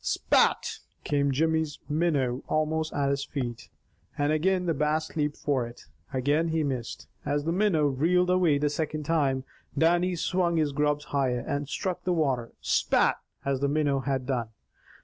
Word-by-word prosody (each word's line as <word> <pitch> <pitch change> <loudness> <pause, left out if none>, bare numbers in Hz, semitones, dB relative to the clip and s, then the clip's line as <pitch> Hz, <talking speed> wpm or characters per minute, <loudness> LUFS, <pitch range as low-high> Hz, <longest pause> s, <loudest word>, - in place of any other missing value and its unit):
"Spat!" - - +2 0.2
came 140 -1 +1
Jimmy's 160 +1 0
minnow 145 -5 0
almost 155 +1 0
at 140 -1 0
his 140 0 -1
feet, 125 -5 -5 0.5
and 145 +1 +1
again 180 +4 +1
the 165 - +1
Bass 150 +2 -1
leaped 150 -2 -1
for 130 -5 0
it. 120 - -13 0.3
Again 145 +5 +1
he 160 -1 0
missed. 130 -5 -4 0.2
As 145 0 -1
the 165 - -1
minnow 180 -5 +2
reeled 170 +7 +2
away 175 -5 +3
the 145 0 0
second 155 0 -2
time, 140 -4 +1 0.3
Dannie 175 +2 +3
swung 175 0 0
his 155 -2 +1
grubs 150 +1 0
higher, 130 -3 +1
and 145 0 -2
struck 185 +4 -3
the 180 - +1
water 135 -8 0
"Spat," - - +2 0.3
as 140 -1 0
the 140 - +1
minnow 145 -2 +1
had 135 -1 -2
done. 125 -4 -2
150 Hz, 165 wpm, -27 LUFS, 140-160 Hz, 0.5 s, away